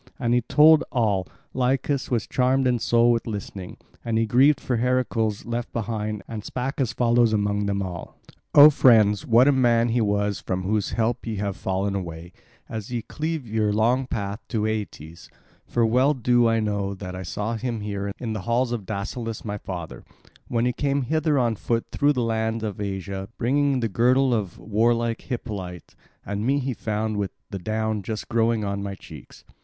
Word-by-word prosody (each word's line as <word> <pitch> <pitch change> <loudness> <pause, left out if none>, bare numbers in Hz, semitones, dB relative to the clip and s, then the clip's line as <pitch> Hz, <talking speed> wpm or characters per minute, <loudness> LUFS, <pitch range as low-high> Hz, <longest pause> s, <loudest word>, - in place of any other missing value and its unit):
And 120 0 0
as - - +4
he - - +2
told 155 +5 +6
all, 105 - +1 0.3
Lycus 130 +2 0
was 115 -4 0
charmed 130 +1 +1
in 125 -2 +2
soul 120 +1 +3
with 115 0 -1
listening; 100 -4 -6 0.3
and 115 -1 -1
he 115 - +2
grieved 130 +6 +4
for 125 -2 -1
Heracles 115 -3 0
left 120 0 -4
behind, 110 -2 -3
and 110 -3 -6
spake 135 +6 -3
as 125 - 0
follows 120 -2 +3
among 105 -1 0
them 100 0 -1
all: 90 -3 -7 0.4
"O 150 +1 +10
friends, 110 -7 +4
what 120 +3 +5
a - - +6
man 120 -3 +3
he 120 +1 +1
was 100 -2 0
from 95 +1 -3
whose 105 +1 -1
help 115 +1 -1
ye 110 - -2
have 100 -1 -2
fallen 95 +1 -2
away, 85 -2 -6 0.3
as 110 0 -6
ye 120 -2 -2
cleave 155 +3 -4
your 110 -1 0
long 120 +5 +2
path 105 -3 -3
to 110 -3 -1
Aeetes; 90 -7 -5 0.4
for 120 - +1
well 130 +6 +3
do 120 -1 +3
I 115 0 +2
know 100 -2 -2
that 90 -1 -7
I 90 - -6
saw 105 +5 -3
him 115 -1 -3
here 100 -1 -3
in 115 -3 -4
the 110 - -4
halls 120 +1 +1
of 110 -6 -4
Dascylus 110 +3 -4
my 105 -1 -4
father, 85 -11 -7 0.4
when 115 0 0
he 125 - +1
came 140 +1 0
hither 155 +2 +1
on 120 -3 +1
foot 115 +2 -1
through 145 0 +2
the 125 -3 -1
land 110 0 -1
of 105 -2 -4
Asia 95 -1 -4
bringing 135 +2 +1
the 115 - +1
girdle 125 +5 +3
of 105 -6 -2
warlike 115 +4 0
Hippolyte; 100 -8 -6 0.3
and 100 +1 -3
me 135 +4 +2
he 135 -1 -2
found 110 -1 -2
with 100 -2 -1 0.2
the 100 - -4
down 110 +2 -2
just 105 +2 -5
growing 115 -1 +1
on 100 0 -2
my 100 -1 -4
cheeks. 75 -7 -13
110 Hz, 190 wpm, -24 LUFS, 100-125 Hz, 0.4 s, O